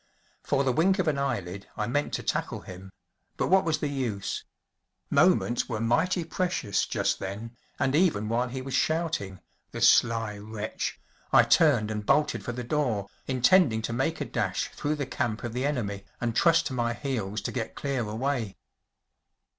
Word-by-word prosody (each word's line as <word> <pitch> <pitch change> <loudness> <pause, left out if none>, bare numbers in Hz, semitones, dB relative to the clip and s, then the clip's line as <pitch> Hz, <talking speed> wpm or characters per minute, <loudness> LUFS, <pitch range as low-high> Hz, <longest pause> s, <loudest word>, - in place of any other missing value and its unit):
For 140 -1 +1
the 130 - +2
wink 190 +7 +3
of 185 -4 0
an 145 -3 +1
eyelid 100 -8 -3
I 105 - 0
meant 145 +6 -1
to - - -2
tackle - - -2
him, 95 +1 -10 0.5
but - - 0
what 190 +1 +5
was 160 -1 +1
the 150 - -2
use? 125 -8 -3 0.7
Moments 120 - +3
were 110 -3 -2
mighty 160 - +1
precious 175 - -1
just - - 0
then, 105 +5 -6 0.2
and 130 - +1
even 150 - +2
while 120 +3 0
he 130 +1 -5
was 135 0 -6
shouting‚ÄĒthe 155 - -2
sly 115 -3 +4
wretch‚ÄĒI 110 0 -1
turned 125 -10 +4
and 105 -1 -3
bolted 150 +7 +2
for 120 - -3
the 125 +1 -5
door, 120 -7 -1 0.2
intending 130 -2 +4
to 115 - -2
make 135 +7 -1
a - - -2
dash - - -1
through 150 +1 -2
the 145 -2 -3
camp 120 -3 -2
of 120 -2 -4
the 130 +3 0
enemy, 100 -8 -3
and 120 -2 -2
trust 165 +3 +4
to 130 - -3
my 120 -2 0
heels 110 -7 -3
to - - -3
get 115 -3 -4
clear 140 -3 -2
away. 115 0 -2
120 Hz, 170 wpm, -27 LUFS, 110-145 Hz, 0.7 s, what